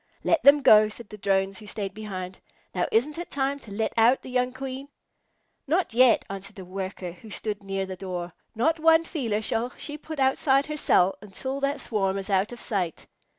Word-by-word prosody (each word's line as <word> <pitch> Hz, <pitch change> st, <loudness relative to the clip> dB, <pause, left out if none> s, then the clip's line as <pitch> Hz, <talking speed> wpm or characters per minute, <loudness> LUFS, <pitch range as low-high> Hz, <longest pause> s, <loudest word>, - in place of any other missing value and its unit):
"Let 330 Hz, -, +2 dB
them 280 Hz, +2 st, +6 dB
go," 215 Hz, -2 st, +7 dB
said 220 Hz, 0 st, -8 dB
the 210 Hz, -, -9 dB
Drones 195 Hz, 0 st, 0 dB
who 210 Hz, -, -12 dB
stayed 200 Hz, -2 st, -4 dB
behind. 190 Hz, -3 st, -6 dB, 0.3 s
"Now, 180 Hz, -, 0 dB
isn't 290 Hz, +8 st, +1 dB
it 345 Hz, -, -6 dB
time 275 Hz, 0 st, -1 dB
to 220 Hz, -, -13 dB
let 220 Hz, +2 st, -2 dB
out 230 Hz, +3 st, +4 dB
the 255 Hz, -, -9 dB
young 250 Hz, 0 st, +1 dB
Queen?" 265 Hz, +1 st, -6 dB, 0.8 s
"Not 335 Hz, -3 st, +1 dB
yet," 250 Hz, 0 st, +5 dB
answered 195 Hz, 0 st, -7 dB
a 190 Hz, -, -8 dB
Worker, 185 Hz, -1 st, -5 dB
who 185 Hz, +6 st, -14 dB
stood 210 Hz, 0 st, -4 dB
near 195 Hz, -1 st, -3 dB
the 190 Hz, 0 st, -6 dB
door. 180 Hz, -1 st, -5 dB, 0.2 s
"Not 320 Hz, +9 st, +1 dB
one 325 Hz, +1 st, +5 dB
feeler 230 Hz, -10 st, -2 dB
shall 225 Hz, +3 st, 0 dB
she 300 Hz, 0 st, -5 dB
put 315 Hz, -1 st, -7 dB
outside 270 Hz, +1 st, +3 dB
her 305 Hz, 0 st, -5 dB
cell 190 Hz, -9 st, +3 dB
until 260 Hz, +7 st, -4 dB
that 275 Hz, 0 st, -1 dB
swarm 195 Hz, -5 st, -1 dB
is 195 Hz, +1 st, -4 dB
out 195 Hz, +3 st, +2 dB
of 240 Hz, -, -8 dB
sight." 185 Hz, -9 st, -2 dB
220 Hz, 200 wpm, -26 LUFS, 195-270 Hz, 0.8 s, go